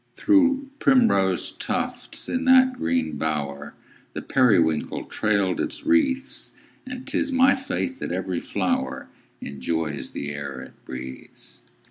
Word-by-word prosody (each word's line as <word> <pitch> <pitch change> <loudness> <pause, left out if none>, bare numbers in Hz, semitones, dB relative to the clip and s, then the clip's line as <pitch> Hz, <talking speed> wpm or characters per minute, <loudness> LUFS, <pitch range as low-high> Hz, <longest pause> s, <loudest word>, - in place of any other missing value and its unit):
Through 275 -3 +3
primrose 100 - +3
tufts, 250 0 -3
in 260 +1 -1
that 260 0 +6
green 80 - -1
bower, 70 -2 -3 0.4
The - - -5
periwinkle 90 - +2
trailed 100 -4 0
its 315 -1 -4
wreaths; 285 -4 +1 0.3
And 255 0 -7
'tis 285 0 0
my 260 +1 +5
faith 265 0 -3
that - - -4
every 90 -1 -2
flower 65 +1 -2 0.3
Enjoys 70 0 -3
the 70 - -4
air 70 -2 -6
it - - -13
breathes. 65 0 -9
100 Hz, 120 wpm, -24 LUFS, -, 0.4 s, that